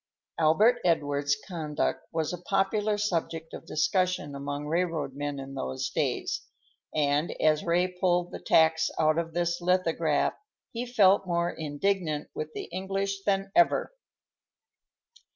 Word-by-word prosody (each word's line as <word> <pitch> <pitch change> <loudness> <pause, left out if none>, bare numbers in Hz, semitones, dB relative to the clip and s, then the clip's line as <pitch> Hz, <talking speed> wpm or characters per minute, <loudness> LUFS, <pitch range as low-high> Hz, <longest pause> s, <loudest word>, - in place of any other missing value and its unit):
Albert 210 +10 +4
Edward's 145 -4 +1
conduct 155 -4 -2
was 160 0 -1
a 175 - -6
popular 205 +3 +1
subject 165 -5 -2
of - - -9
discussion 170 -1 0
among 145 +1 -4
railroad 160 -3 -1
men 145 0 -4
in 135 0 -7
those 130 -1 -3
days, - - -1 0.5
and 145 +2 0
as 155 -1 +3
Ray 175 +1 +2
pulled 180 -1 0
the - - -6
tacks 160 0 +3
out 155 +1 +3
of 165 -1 -4
this 175 0 0
lithograph 170 -4 +1 0.4
he 240 +2 -4
felt 200 -5 +4
more 170 0 0
indignant 155 0 -2
with 155 0 -5
the - - -4
English 195 +2 -2
than 195 -1 0
ever. 345 +7 +3
170 Hz, 135 wpm, -28 LUFS, 150-185 Hz, 0.5 s, Albert